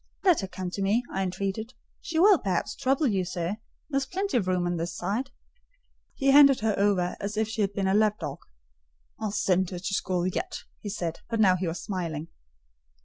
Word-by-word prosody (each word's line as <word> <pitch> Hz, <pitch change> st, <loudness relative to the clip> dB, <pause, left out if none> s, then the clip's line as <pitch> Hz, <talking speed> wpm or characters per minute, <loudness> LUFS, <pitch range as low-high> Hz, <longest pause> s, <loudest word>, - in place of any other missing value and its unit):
"Let 365 Hz, -5 st, +5 dB
her 195 Hz, -, -4 dB
come 185 Hz, -1 st, -5 dB
to 200 Hz, -, -4 dB
me," 210 Hz, +5 st, +2 dB
I 195 Hz, -, -1 dB
entreated: 195 Hz, +5 st, -3 dB, 0.3 s
"she 325 Hz, -, -4 dB
will, 380 Hz, 0 st, +6 dB
perhaps, 195 Hz, +1 st, -1 dB
trouble 275 Hz, +2 st, +1 dB
you, 200 Hz, -7 st, +1 dB
sir: 175 Hz, +2 st, -3 dB, 0.3 s
there 275 Hz, -, +1 dB
is 270 Hz, -, -4 dB
plenty 390 Hz, -2 st, -2 dB
of 210 Hz, -7 st, +1 dB
room 180 Hz, -1 st, +1 dB
on 175 Hz, 0 st, -1 dB
this 170 Hz, +1 st, -3 dB
side." 245 Hz, +7 st, -2 dB, 0.9 s
He 275 Hz, -1 st, +3 dB
handed 275 Hz, -3 st, +7 dB
her 220 Hz, -1 st, +2 dB
over 195 Hz, -3 st, +1 dB
as 205 Hz, +2 st, -4 dB
if 220 Hz, 0 st, +1 dB
she 220 Hz, 0 st, -3 dB
had 200 Hz, -1 st, 0 dB
been 195 Hz, -1 st, -1 dB
a 190 Hz, -, +2 dB
lapdog. 210 Hz, 0 st, +1 dB, 0.8 s
"I'll 215 Hz, -1 st, -2 dB
send 190 Hz, -3 st, +1 dB
her 180 Hz, -, -5 dB
to 190 Hz, +2 st, -4 dB
school 180 Hz, -2 st, 0 dB
yet," 185 Hz, -, -3 dB, 0.2 s
he 205 Hz, -, -5 dB
said, 175 Hz, -5 st, -3 dB
but 230 Hz, -1 st, -1 dB
now 190 Hz, -4 st, +5 dB
he 185 Hz, 0 st, -2 dB
was 165 Hz, +1 st, -4 dB
smiling. 165 Hz, -5 st, -4 dB
200 Hz, 205 wpm, -27 LUFS, 185-225 Hz, 0.9 s, handed